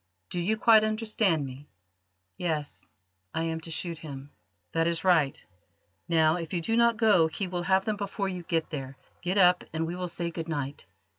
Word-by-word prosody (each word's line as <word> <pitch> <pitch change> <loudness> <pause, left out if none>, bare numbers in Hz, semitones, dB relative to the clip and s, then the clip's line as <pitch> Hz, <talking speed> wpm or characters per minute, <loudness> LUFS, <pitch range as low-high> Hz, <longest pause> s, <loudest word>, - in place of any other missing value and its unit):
Do 175 - -1
you 210 +6 0
quite 220 -1 +6
understand 215 -7 +1
me?" 135 +2 -9 0.7
"Yes; 155 -4 -3 0.5
I 165 - 0
am 160 0 -2
to 165 - -7
shoot 165 +1 -3
him." 140 -2 -9 0.4
"That 165 0 +1
is 170 -1 0
right. 165 -7 +2 0.6
Now, 160 0 +4
if 165 -1 -6
you - - +1
do 225 +7 0
not 235 -1 +4
go 210 -8 +5
he 185 +4 -3
will 180 -1 -3
have 190 +2 +2
them 215 -1 -1
before 200 0 -3
you 180 -2 -4
get 165 -1 -2
there. 135 -3 -6 0.2
Get 180 +3 -1
up 180 -2 +5
and 160 +1 -1
we 170 +2 -4
will 180 0 -3
say 170 0 -2
good 165 0 -5
night. 145 -8 -4
170 Hz, 195 wpm, -28 LUFS, 160-190 Hz, 0.7 s, quite